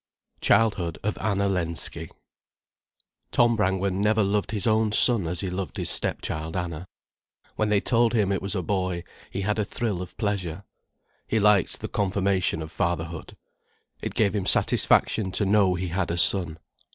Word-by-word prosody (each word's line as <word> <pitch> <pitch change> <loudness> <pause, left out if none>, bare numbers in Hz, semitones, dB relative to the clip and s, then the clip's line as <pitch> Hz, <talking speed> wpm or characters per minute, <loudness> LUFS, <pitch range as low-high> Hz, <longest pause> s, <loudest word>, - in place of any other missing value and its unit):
CHILDHOOD 95 -7 +2
OF 105 - -1
ANNA 100 -2 0
LENSKY 85 -4 -2 1.2
Tom 120 -1 +3
Brangwen 95 -2 0
never 105 +1 +2
loved 100 +1 0
his 105 -3 -1
own 110 -1 +2
son 105 -4 +5
as 85 +1 -2
he 95 -2 -3
loved 90 0 -5
his - - 0
stepchild 80 +2 -2
Anna. 90 0 -5 0.7
When 110 -1 0
they 105 -1 +2
told 115 -1 +2
him 105 -4 +1
it 95 - -1
was 100 +2 -1
a 95 - -2
boy, 90 -2 -2 0.3
he 100 - -4
had 105 +2 -1
a - - +2
thrill 105 -3 -3
of 90 - -9
pleasure. 100 -4 -3 0.6
He 110 - +1
liked 105 -3 +2
the - - -4
confirmation 95 -4 0
of 80 - -9
fatherhood. 85 -3 -3 0.6
It - - -5
gave 100 -3 +2
him 100 -3 -2
satisfaction 100 -4 +2
to 105 - 0
know 100 -2 +3
he 90 0 -3
had 90 +1 -2
a 85 - -2
son. 85 -3 +2
95 Hz, 165 wpm, -25 LUFS, 90-105 Hz, 1.2 s, son